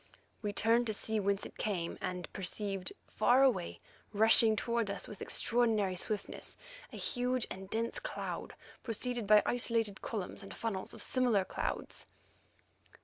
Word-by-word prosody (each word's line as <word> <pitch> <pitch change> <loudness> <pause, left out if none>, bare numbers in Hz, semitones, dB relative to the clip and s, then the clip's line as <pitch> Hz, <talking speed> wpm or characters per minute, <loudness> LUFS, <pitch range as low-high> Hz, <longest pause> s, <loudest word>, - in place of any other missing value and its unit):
We 210 -2 -2
turned 230 +3 +3
to 215 - 0
see 220 +1 0
whence 200 0 0
it - - -11
came, 180 -6 -2
and 180 -1 -3
perceived, 195 0 -1 0.2
far 255 +2 +4
away, 85 - +1 0.3
rushing 220 +1 +6
towards 235 -1 0
us 200 -2 -4
with 210 - -10
extraordinary 220 -5 +2
swiftness, 200 +2 -4 0.3
a - - -8
huge 250 -1 0
and 190 0 -7
dense 230 - -1
cloud - - -5 0.3
preceded 240 -1 -2
by 210 0 +7
isolated 230 -4 +1
columns 205 -6 -4
and 195 - -9
funnels 210 -5 -3
of - - +1
similar 240 -7 +2
clouds. - - -4
215 Hz, 145 wpm, -33 LUFS, 195-235 Hz, 0.3 s, by